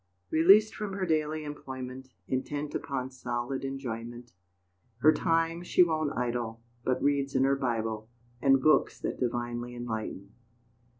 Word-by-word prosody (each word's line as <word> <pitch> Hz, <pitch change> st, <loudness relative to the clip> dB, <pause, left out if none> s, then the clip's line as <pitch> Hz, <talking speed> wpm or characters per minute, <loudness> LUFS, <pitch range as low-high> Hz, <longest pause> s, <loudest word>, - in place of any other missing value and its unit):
Released 195 Hz, +7 st, +6 dB
from 210 Hz, -2 st, -4 dB
her 190 Hz, -1 st, -1 dB
daily 155 Hz, -1 st, 0 dB
employment, 130 Hz, -3 st, -7 dB, 0.2 s
Intent 145 Hz, +3 st, -2 dB
upon 130 Hz, -1 st, -3 dB
solid 125 Hz, +1 st, -3 dB
enjoyment, 120 Hz, -3 st, -5 dB, 0.6 s
Her 150 Hz, +6 st, +6 dB
time 165 Hz, 0 st, +1 dB
she 180 Hz, +1 st, +5 dB
won't 155 Hz, -3 st, -1 dB
idle, 120 Hz, -2 st, -2 dB, 0.2 s
But 130 Hz, 0 st, 0 dB
reads 140 Hz, -1 st, +1 dB
in 130 Hz, -, +4 dB
her 135 Hz, +1 st, +4 dB
Bible, 115 Hz, -4 st, -2 dB, 0.3 s
And 135 Hz, -1 st, +5 dB
books 155 Hz, -, +4 dB
that -, -, -3 dB
divinely 120 Hz, 0 st, -2 dB
enlighten. 110 Hz, -4 st, -5 dB
130 Hz, 130 wpm, -29 LUFS, 120-155 Hz, 0.6 s, Released